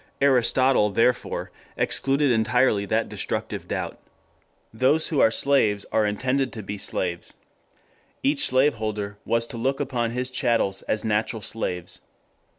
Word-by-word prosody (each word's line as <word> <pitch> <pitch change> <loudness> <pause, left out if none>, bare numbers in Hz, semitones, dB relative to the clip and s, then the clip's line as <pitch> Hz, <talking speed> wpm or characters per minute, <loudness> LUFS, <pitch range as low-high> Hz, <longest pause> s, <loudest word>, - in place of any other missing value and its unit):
Aristotle, 130 -3 +3
therefore, 115 +4 0 0.3
excluded 140 0 +2
entirely 110 -2 +2
that - - 0
destructive - - -4
doubt. - - -4 0.7
Those 135 +7 +2
who 150 - 0
are - - +6
slaves 110 -5 +1
are 110 -1 +2
intended 130 +5 -1
to 110 - -7
be 100 +1 -6
slaves. 85 -3 -3 0.9
Each 140 +1 +3
slave 130 +3 +3
holder 105 -2 -4
was 115 0 +1
to 120 - -8
look 135 +4 -1
upon 125 -5 -1
his 125 +2 -3
chattels 115 -7 0
as 110 - -2
natural 110 0 -1
slaves. 90 -5 -4
115 Hz, 135 wpm, -24 LUFS, 105-130 Hz, 0.9 s, are